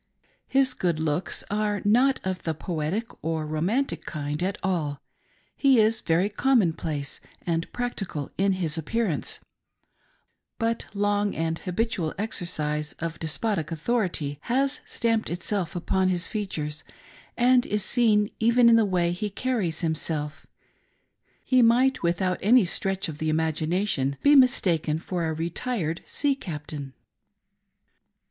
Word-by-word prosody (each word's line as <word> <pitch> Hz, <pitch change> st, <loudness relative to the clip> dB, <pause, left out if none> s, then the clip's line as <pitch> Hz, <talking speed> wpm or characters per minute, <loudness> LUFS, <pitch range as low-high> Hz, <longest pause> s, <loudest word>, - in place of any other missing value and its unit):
His 265 Hz, -1 st, +4 dB
good 170 Hz, -7 st, -1 dB
looks 160 Hz, +2 st, 0 dB
are 210 Hz, 0 st, 0 dB
not 250 Hz, +6 st, +4 dB
of 185 Hz, -1 st, -3 dB
the 160 Hz, -1 st, -2 dB
poetic 170 Hz, +6 st, -2 dB, 0.2 s
or 160 Hz, -1 st, -1 dB
romantic 180 Hz, -, -1 dB
kind 150 Hz, 0 st, -4 dB
at 190 Hz, +3 st, -1 dB
all; 160 Hz, -7 st, -1 dB, 0.6 s
he 270 Hz, -4 st, +4 dB
is 220 Hz, +1 st, +3 dB
very 170 Hz, +4 st, +2 dB
common 215 Hz, -4 st, +2 dB
place 145 Hz, -4 st, -4 dB, 0.2 s
and 165 Hz, -1 st, -1 dB
practical 195 Hz, -, -4 dB
in 195 Hz, +1 st, +2 dB
his 170 Hz, -3 st, -1 dB
appearance, 190 Hz, +1 st, -1 dB, 1.2 s
but 230 Hz, 0 st, -1 dB
long 205 Hz, 0 st, +1 dB
and 165 Hz, 0 st, -1 dB
habitual 180 Hz, -4 st, -2 dB
exercise 155 Hz, -7 st, -1 dB
of 165 Hz, 0 st, -5 dB
despotic 165 Hz, +1 st, -1 dB
authority 165 Hz, -6 st, -1 dB
has 265 Hz, +3 st, +1 dB
stamped 230 Hz, -1 st, 0 dB
itself 175 Hz, 0 st, -2 dB
upon 185 Hz, +2 st, +1 dB
his, 180 Hz, -1 st, +2 dB
features, 160 Hz, -8 st, -4 dB, 0.5 s
and 250 Hz, 0 st, +4 dB
is 210 Hz, -1 st, +1 dB
seen 215 Hz, -4 st, +3 dB
even 235 Hz, +1 st, +5 dB
in 230 Hz, -, +7 dB
the 225 Hz, -, +4 dB
way 175 Hz, -3 st, +1 dB
he 195 Hz, +4 st, -3 dB
carries" 205 Hz, -7 st, -1 dB
himself 155 Hz, -2 st, -1 dB, 0.5 s
:— -, -, -42 dB
he 255 Hz, -1 st, +4 dB
might 250 Hz, +3 st, +4 dB
without 180 Hz, +1 st, 0 dB
any 230 Hz, +1 st, +5 dB
stretch 195 Hz, +2 st, -2 dB
of 155 Hz, -2 st, -7 dB
the 155 Hz, -, -1 dB
imagination 160 Hz, -2 st, 0 dB
be 285 Hz, -, +6 dB
mistaken 180 Hz, -, +3 dB
for 170 Hz, 0 st, -3 dB
a 160 Hz, -, -1 dB
retired 170 Hz, +1 st, -2 dB
sea. 285 Hz, -1 st, +1 dB
captain. 150 Hz, -, -6 dB
185 Hz, 135 wpm, -26 LUFS, 160-225 Hz, 1.2 s, in